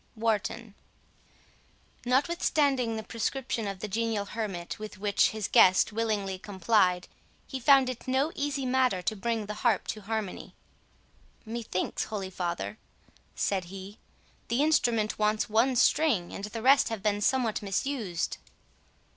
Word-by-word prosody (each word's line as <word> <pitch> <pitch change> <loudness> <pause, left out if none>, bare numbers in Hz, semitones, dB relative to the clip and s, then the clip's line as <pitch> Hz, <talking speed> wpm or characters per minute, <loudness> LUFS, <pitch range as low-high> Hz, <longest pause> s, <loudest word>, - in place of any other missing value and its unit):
WARTON 225 0 -1 1.3
Notwithstanding 270 -3 +2
the 220 - -4
prescription 230 0 -3
of 195 -2 -5
the 215 - -3
genial 220 0 -1
hermit, 200 -5 -5
with 215 -1 -8
which 205 0 +2
his 215 -2 -3
guest 185 +3 +5
willingly 210 -4 -1
complied, 185 -2 +1 0.4
he 265 - -5
found 270 +1 +6
it 255 -1 -6
no 265 +5 +1
easy 280 -1 -2
matter 255 -7 +1
to 215 - -1
bring 225 +1 -2
the 210 - -5
harp 230 -5 +2
to 215 - -4
harmony. 215 -2 -4 0.9
"Methinks, 225 -4 -3
holy 195 -3 -5
father," 170 - -4 0.6
said 190 -3 0
he, 195 +3 -10 0.5
"the 240 +5 +1
instrument 235 -9 +2
wants 215 0 +1
one 240 +4 +3
string, 240 - +2
and 200 - -5
the 220 +1 -6
rest 270 0 +5
have 220 -3 -5
been 205 -1 +1
somewhat 240 -1 +1
misused." 200 -3 -2
220 Hz, 135 wpm, -28 LUFS, 200-250 Hz, 1.3 s, found